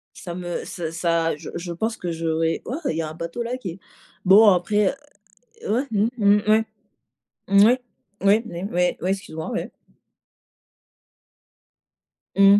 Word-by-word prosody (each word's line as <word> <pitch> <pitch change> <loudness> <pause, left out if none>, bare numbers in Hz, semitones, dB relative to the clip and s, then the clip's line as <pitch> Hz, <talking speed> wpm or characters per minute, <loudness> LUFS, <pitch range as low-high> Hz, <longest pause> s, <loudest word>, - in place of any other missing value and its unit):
ça 175 - -7
me 175 -1 -4
ça 165 -3 -5
ça 165 -1 +1
je - - -9
je 170 0 -4
pense 225 +6 -2
que 175 - -4
j'aurais 165 0 -1
ouah 270 +7 -4
il 160 - -1
y - - 0
a 155 - -4
un - - -8
bateau 170 +8 -4
là 245 +2 -3
qui 190 -9 -5
est 185 - -11 0.5
bon 205 +3 +8
après 205 +6 +2 0.7
ouais, 245 +6 +1
mmh, 210 +2 +2
mmh, 205 -1 +5
ouais, 220 +1 +5 0.9
ouais, 215 +6 +6 0.4
ouais, 205 +4 +4 0.3
ouais, 180 0 +1
ouais 185 - -1
excuse-moi, 160 -3 -4
ouais. 235 - -3 2.6
Mmh. 200 +1 +7
190 Hz, 150 wpm, -23 LUFS, 170-215 Hz, 2.6 s, bon